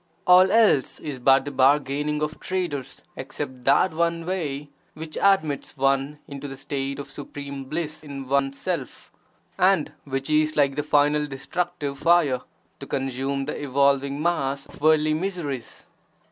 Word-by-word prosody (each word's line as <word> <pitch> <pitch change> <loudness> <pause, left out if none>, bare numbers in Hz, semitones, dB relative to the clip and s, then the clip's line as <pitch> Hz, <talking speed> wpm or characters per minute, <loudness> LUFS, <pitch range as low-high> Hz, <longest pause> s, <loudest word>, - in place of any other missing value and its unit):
All 180 +1 +7
else 215 - +3
is 145 -4 -6
but 135 +2 +4
the 145 - -4
bargaining 145 +2 +2
of 150 0 -3
traders 175 -8 -4
except 130 -2 -6
that 145 +6 +4
one 170 0 0
way 150 -6 -3 0.2
which 155 0 -8
admits 155 -8 +1
one 135 +2 +1
into 140 0 -7
the 135 -1 -8
state 140 0 -3
of 140 - -6
supreme 140 -1 -7
bliss 155 +2 -4
in 140 -3 -7
one's 140 0 +1
Self, 170 -8 -4 0.5
and 185 -4 +3
which 135 -1 -3
is 155 0 +2
like 140 -2 +2
the 150 - 0
(final) 150 0 +2
destructive 145 +1 -4
fire 160 -7 +3 0.4
to 140 - -8
consume 135 +1 -2
the 150 - -4
evolving 140 0 +2
mass 140 -5 0
of - - -16
worldly 155 0 +4
miseries. 155 -7 -4
145 Hz, 145 wpm, -24 LUFS, 135-155 Hz, 0.5 s, All